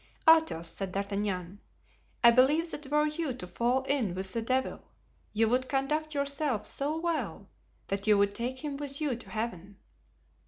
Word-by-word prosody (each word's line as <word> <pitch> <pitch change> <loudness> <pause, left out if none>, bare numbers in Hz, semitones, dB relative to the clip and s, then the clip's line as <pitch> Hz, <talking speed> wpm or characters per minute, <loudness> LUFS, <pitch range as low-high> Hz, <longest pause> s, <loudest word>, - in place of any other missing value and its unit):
"Athos," 320 - +5
said 190 +3 -4
D'Artagnan, 200 -2 -2 0.6
"I 235 - +10
believe 295 +7 +4
that 295 -1 -6
were 300 +1 +3
you 305 -3 -2
to 185 - -7
fall 240 +8 0
in 265 -9 0
with 190 0 -3
the 230 - -1
devil, 260 +3 -1 0.5
you 225 +1 +2
would 255 +3 +1
conduct 300 +3 0
yourself 280 -5 0
so 295 +3 -2
well 285 - -2 0.4
that 195 +1 -3
you 210 -1 +6
would 200 0 +3
take 255 +5 -4
him 285 -2 -3
with 285 -1 -5
you 295 -5 0
to 235 - -11
Heaven." 205 -4 -4
255 Hz, 165 wpm, -30 LUFS, 200-290 Hz, 0.6 s, I